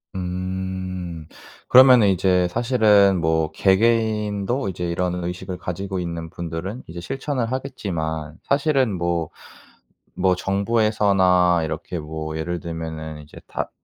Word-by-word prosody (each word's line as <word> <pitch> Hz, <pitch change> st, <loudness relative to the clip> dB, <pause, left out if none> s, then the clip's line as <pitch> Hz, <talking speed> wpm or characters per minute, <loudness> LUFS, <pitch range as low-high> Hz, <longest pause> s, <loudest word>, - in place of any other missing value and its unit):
음. 95 Hz, -2 st, -4 dB, 0.4 s
그러면은 125 Hz, -4 st, +8 dB
이제 90 Hz, -1 st, +2 dB
사실은 105 Hz, -4 st, +4 dB
뭐 80 Hz, -1 st, +1 dB
개개인도 105 Hz, +2 st, +1 dB
이제 90 Hz, -1 st, -4 dB
이런 90 Hz, +1 st, -2 dB
의식을 90 Hz, +1 st, -5 dB
가지고 95 Hz, +2 st, -4 dB
있는 85 Hz, -2 st, -5 dB
분들은 85 Hz, +7 st, -6 dB
이제 85 Hz, +1 st, -8 dB
실천을 130 Hz, -, -3 dB
하겠지만 80 Hz, -, -4 dB
사실은 140 Hz, -5 st, +1 dB
뭐, 85 Hz, -3 st, -1 dB, 0.9 s
뭐 95 Hz, -1 st, +2 dB
정부에서나 95 Hz, -3 st, +2 dB
이렇게 80 Hz, +3 st, -4 dB
뭐 80 Hz, 0 st, -5 dB
예를 85 Hz, +2 st, -3 dB
들면은 80 Hz, -2 st, -6 dB
이제 75 Hz, -, -16 dB
다 -, -, -4 dB
90 Hz, 265 characters per minute, -22 LUFS, 85-105 Hz, 0.9 s, 그러면은